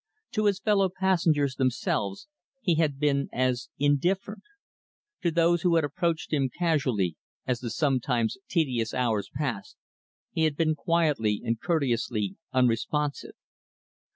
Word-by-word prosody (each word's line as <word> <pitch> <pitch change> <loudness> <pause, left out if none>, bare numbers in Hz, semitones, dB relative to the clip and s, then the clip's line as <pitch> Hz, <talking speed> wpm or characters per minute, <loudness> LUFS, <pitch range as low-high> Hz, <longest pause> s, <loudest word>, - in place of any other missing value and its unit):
To 215 -2 0
his 200 -2 +2
fellow 195 -2 +2
passengers, 165 -7 +1
themselves, 115 - -1 0.3
he 205 -9 +1
had 155 -4 +1
been 140 -1 +1
as 125 0 0
indifferent. 175 +9 +1 0.8
To 175 - +2
those 170 +1 +3
who 175 0 +3
had 165 - +3
approached 160 +2 -2
him 135 -3 +2
casually, 130 - 0 0.3
as 125 -2 -1
the 120 - -4
sometimes 125 -3 0
tedious 125 -10 0
hours 115 -5 0
passed, 125 -8 -4 0.5
he 160 - +1
had 150 -2 0
been 160 -1 +2
quietly 150 - +1
and 115 0 -1
courteously 120 - 0 0.2
unresponsive. 130 +4 0
145 Hz, 125 wpm, -27 LUFS, 125-170 Hz, 0.8 s, those